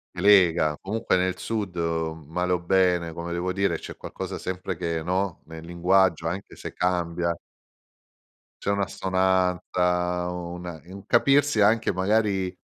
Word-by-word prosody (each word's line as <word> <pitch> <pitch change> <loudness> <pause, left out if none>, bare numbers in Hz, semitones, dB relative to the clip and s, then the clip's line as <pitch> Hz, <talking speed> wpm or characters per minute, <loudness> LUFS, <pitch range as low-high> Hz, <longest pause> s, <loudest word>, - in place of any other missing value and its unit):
Che 90 - -4
lega, 90 -6 +5
comunque 105 -1 0
nel 90 0 0
sud 105 -5 -3
male 80 +1 -2
o 90 - +1
bene, 90 -2 +2
come 85 +1 -5
devo 90 +1 -1
dire, 95 -3 +1
c'è - - -9
qualcosa - - -6
sempre 95 0 -4
che, 85 -2 -2
no, 90 0 -1
nel 80 0 -10
linguaggio, 85 -1 +2
anche 90 +4 -5
se - - -8
cambia 85 -2 -1 1.3
c'è - - 0
un'assonanza, 90 -2 0
una 90 -2 -6
un 95 +2 -11
capirsi 135 +1 +3
anche 110 +2 +3
magari 95 -1 +1
90 Hz, 130 wpm, -25 LUFS, 85-95 Hz, 1.3 s, lega